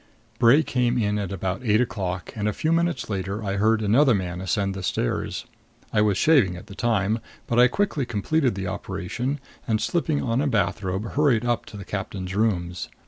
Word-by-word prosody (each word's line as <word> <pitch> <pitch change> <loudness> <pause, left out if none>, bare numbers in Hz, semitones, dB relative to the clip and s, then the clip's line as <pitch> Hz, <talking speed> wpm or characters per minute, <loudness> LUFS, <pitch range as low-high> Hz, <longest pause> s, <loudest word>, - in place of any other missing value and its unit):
Bray 130 +6 +6
came 125 -3 +1
in 105 -2 +1
about 95 0 -3
eight 110 -2 +3
o'clock 95 -7 -2
and 105 -1 -1
a 105 - 0
few 160 - -1
minutes 165 -5 +1
later 100 +1 -3
I 100 -1 -2
heard 110 +2 +2
another 120 +4 +4
man 90 -2 -3
ascend 95 +2 0
the 95 - -6
stairs. - - -2 0.5
I 105 - +4
was 105 -3 +2
shaving 135 - +4
at 90 - -10
the 105 - -11
time, 110 0 +1 0.3
but 120 - +1
I 125 - +8
quickly 150 -2 -1
completed 125 +3 +1
the 95 0 -4
operation 100 +8 -3 0.3
and, 110 -2 +1
slipping 155 +5 0
on 120 +2 0
a 145 - +1
bathrobe, 100 -3 -1
hurried 140 -6 +2
up 120 -1 0
to 105 - -9
the 100 - -8
captain's 95 -2 -4
rooms. 90 -5 -1
105 Hz, 190 wpm, -24 LUFS, 95-125 Hz, 0.5 s, I